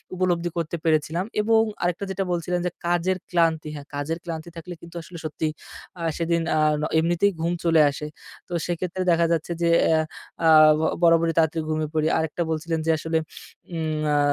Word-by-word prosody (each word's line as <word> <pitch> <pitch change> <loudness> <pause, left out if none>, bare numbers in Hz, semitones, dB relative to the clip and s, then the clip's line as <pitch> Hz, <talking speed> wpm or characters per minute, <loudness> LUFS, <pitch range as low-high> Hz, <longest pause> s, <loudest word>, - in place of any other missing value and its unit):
উপলব্ধি 175 -2 0
করতে 170 0 -2
পেরেছিলাম। 160 +2 +1 0.2
এবং 220 +1 +4 0.2
আরেকটা 175 +3 -1
যেটা 195 +1 -1
বলছিলেন 175 +1 -1
যে, 180 - 0 0.2
কাজের 175 +2 +1
ক্লান্তি, 165 -3 +1
হ্যাঁ, 145 -1 -9
কাজের 145 +3 -2
ক্লান্তি 165 -1 -6
থাকলে 170 +2 -7
কিন্তু 170 0 -13
আসলে 170 +1 -11
সত্যি 155 0 -2 0.5
আ - - -6 0.2
সেদিন 170 0 +1 0.2
আ - - +3 0.4
এমনিতেই 175 +5 +2
ঘুম 170 +1 0
চলে 165 -2 +5
আসে। 150 +2 -6 0.4
তো - - -6
সেক্ষেত্রে 175 +1 -3
দেখা 170 0 +3
যাচ্ছে 165 0 -1
যে, 170 - +3 0.2
এ - - +3 0.5
আ - - +5 0.6
বরাবরই 165 0 +4
তাড়াতাড়ি 160 0 +2
ঘুমিয়ে 155 -1 -1
পড়ি। 155 -1 +1
আরেকটা 160 +2 -2
বলছিলেন 160 +1 -1
যে, 165 - +3
আসলে 160 +1 -1 0.6
উম 155 -1 -2
আ - - +3
165 Hz, 170 wpm, -24 LUFS, 160-175 Hz, 0.6 s, চলে